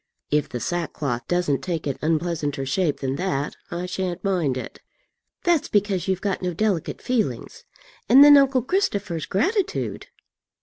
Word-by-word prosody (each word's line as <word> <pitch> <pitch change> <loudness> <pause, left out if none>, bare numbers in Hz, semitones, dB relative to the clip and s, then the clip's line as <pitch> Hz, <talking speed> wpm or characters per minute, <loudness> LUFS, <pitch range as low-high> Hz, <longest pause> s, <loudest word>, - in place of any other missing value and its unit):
"If 150 -1 +1
the 125 - -4
sackcloth 140 -5 -3
doesn't 175 -7 0
take 165 +2 -3
an 140 -2 -3
unpleasanter 155 -3 -1
shape 160 +1 0
than 135 0 -2
that, 170 -6 -2
I 175 +1 -4
shan't 180 -1 -3
mind 175 -10 0
it." - - -7 0.6
"That's 345 -4 +2
because 200 -3 0
you've 190 -1 0
got 200 -2 -2
no 180 -2 -2
delicate 195 -5 -1
feelings. 215 - -2 0.4
And 265 +5 +9
then 290 0 +9
uncle 270 -3 +4
Christopher's 200 - -1
gratitude!" 380 - -1
180 Hz, 145 wpm, -23 LUFS, 150-205 Hz, 0.6 s, And